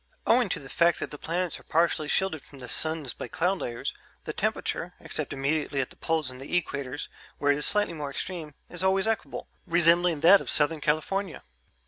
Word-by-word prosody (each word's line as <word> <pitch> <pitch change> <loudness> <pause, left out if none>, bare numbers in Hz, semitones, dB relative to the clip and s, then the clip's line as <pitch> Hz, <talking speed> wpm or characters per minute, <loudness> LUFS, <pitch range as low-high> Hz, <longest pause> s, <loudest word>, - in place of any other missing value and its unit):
Owing 240 -2 +4
to - - -1
the 135 - -11
fact 170 +4 +3
that - - -4
the 150 - -7
planets 175 +1 -2
are - - -17
partially 165 -1 +1
shielded 190 -3 +1
from 140 - -15
the 125 -2 -8
suns 155 -1 0
by - - -6
cloud 180 +3 0
layers, 120 -1 -3 0.3
the - - -4
temperature - - -1
except - - -3
immediately 140 +1 0
at 130 - -1
the - - -12
poles 160 -5 -1
and 130 0 -11
the 175 +6 +1
equators, 140 -3 -5 0.3
where 145 0 +3
it 140 - +2
is - - +1
slightly 205 -4 +1
more 150 -3 -4
extreme 155 0 -5
is 175 +1 -6
always 190 0 +3
equable, 225 -1 -2 0.2
resembling 170 -1 +4
that 190 +5 +8
of - - -6
Southern 150 +1 +2
California...." 180 +7 -1
160 Hz, 200 wpm, -28 LUFS, 145-180 Hz, 0.3 s, that